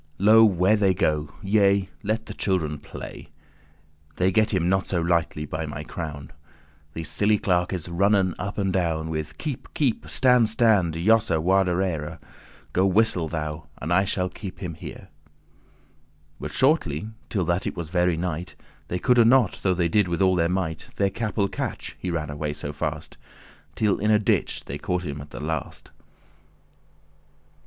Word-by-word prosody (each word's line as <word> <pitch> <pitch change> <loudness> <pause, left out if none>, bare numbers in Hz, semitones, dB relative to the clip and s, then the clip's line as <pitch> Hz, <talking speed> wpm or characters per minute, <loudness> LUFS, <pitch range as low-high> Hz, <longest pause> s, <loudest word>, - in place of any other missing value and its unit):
Lo 110 +3 +7
where 95 0 +4
they 100 -3 +2
go! 75 -3 0
yea, 100 -1 +3
let 110 +2 -2
the - - -7
children 80 -7 -1
play: 75 - -9 0.9
They 90 +1 +2
get 110 +3 +2
him 90 -3 +1
not 95 +1 +1
so 90 - 0
lightly, 85 -2 0
by 80 +2 -4
my 75 0 -6
crown." 75 -4 -7 0.6
These 80 0 -4
silly 105 +1 +2
clerkes 90 -2 0
runnen 95 +1 +2
up 100 - -4
and 95 -2 0
down 80 -3 -1
With 80 -1 -4
"Keep, 145 -5 -6
keep; 130 -7 0
stand, 125 -4 +4
stand; 105 -8 +3
jossa*, 100 -1 +3
warderere. 90 -3 +1
*turn - - -24 0.4
Go 95 +2 +3
whistle 95 -4 +3
thou, 75 -1 -4
and 80 +4 -2
I 95 +2 +4
shall 95 -2 -1
keep* 95 +1 -8
him 90 -3 -5
here." 80 - -8
*catch - - -18 1.3
But - - -5
shortly, 110 - +1 0.2
till 95 -5 -1
that 85 +2 0
it - - -4
was 85 -3 -5
very 90 -1 +1
night 90 0 -4 0.3
They 90 - -2
coulde 120 +4 +4
not, 125 -5 +4
though 95 -2 +2
they 85 -1 +1
did 100 +3 +2
all 95 -1 +4
their 85 -1 +2
might, 85 -4 -2
Their 100 -1 +1
capel 105 -2 -1
catch, 95 - -5
he 90 - -4
ran 80 -4 -2
alway 75 0 -3
so 75 0 -6
fast: 75 +1 -5 0.6
Till 105 -3 +1
in 105 - +1
a 105 - +6
ditch 105 - 0
they - - -6
caught 90 0 -2
him 70 -1 -5
at 75 - -11
the - - -8
last. 75 -1 -5
90 Hz, 170 wpm, -25 LUFS, 80-100 Hz, 1.3 s, Lo